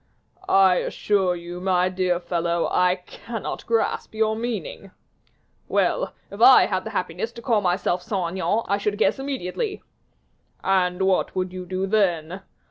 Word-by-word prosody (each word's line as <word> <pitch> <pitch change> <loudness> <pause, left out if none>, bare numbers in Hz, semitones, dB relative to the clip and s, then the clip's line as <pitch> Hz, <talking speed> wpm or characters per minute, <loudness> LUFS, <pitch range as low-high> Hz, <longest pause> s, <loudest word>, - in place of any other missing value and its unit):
"I 190 -2 +5
assure 190 -4 0
you, 175 +1 -8
my 185 -1 +2
dear 185 -1 0
fellow, 170 -1 -1
I 180 0 +3
cannot 230 -2 -6
grasp 230 -1 -1
your 220 0 +1
meaning." 220 -4 -5 0.8
"Well! - - 0 0.2
if - - -8
I - - +8
had - - -2
the - - -4
happiness 455 - -3
to 235 - -10
call 225 -4 +2
myself 180 -1 0
Saint 185 -4 -2
Aignan, 200 +4 0
I 200 - +1
should 205 0 -1
guess 220 - +2
immediately." 275 - -4 0.8
"And 185 -1 +1
what 190 -1 +1
would 185 -1 -2
you 185 -1 -7
do 185 +1 -2
then?" 185 -3 0
190 Hz, 150 wpm, -23 LUFS, 180-215 Hz, 0.8 s, I